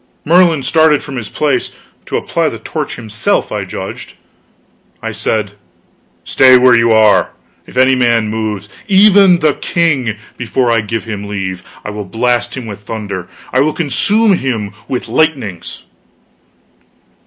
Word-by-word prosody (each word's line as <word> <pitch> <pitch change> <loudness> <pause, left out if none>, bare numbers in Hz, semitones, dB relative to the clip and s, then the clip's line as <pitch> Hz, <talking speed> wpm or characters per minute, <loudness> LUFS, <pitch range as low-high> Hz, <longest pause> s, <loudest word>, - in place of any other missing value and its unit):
Merlin 170 -3 +4
started 160 +1 +3
from 140 - -8
his 120 -4 -5
place 140 -5 -1 0.4
to - - -1
apply - - -1
the - - -7
torch - - -5
himself, 105 -2 -2
I - - -3
judged. - - -7 0.9
I - - -5
said: 105 -2 -2 0.7
"Stay 130 -1 +5
where 125 -1 +5
you 115 0 +3
are. 110 -1 +4 0.3
If - - -11
any 130 +1 +5
man 120 -3 +2
moves 105 -2 -3 0.2
even 195 -3 +5
the 155 -2 +3
king 140 -12 0 0.2
before 120 0 0
I 115 -1 +2
give 110 +1 -4
him 105 -2 -6
leave, 95 -3 -4 0.2
I 105 - -4
will 105 0 -5
blast 120 +3 -1
him 130 - -6
with 105 -2 -7
thunder, 100 -4 -6 0.2
I 130 - +3
will 150 +3 +2
consume 200 - +2
him 110 -7 -3
with 125 - -3
lightnings!" 125 - -2
120 Hz, 145 wpm, -14 LUFS, 105-150 Hz, 0.9 s, Stay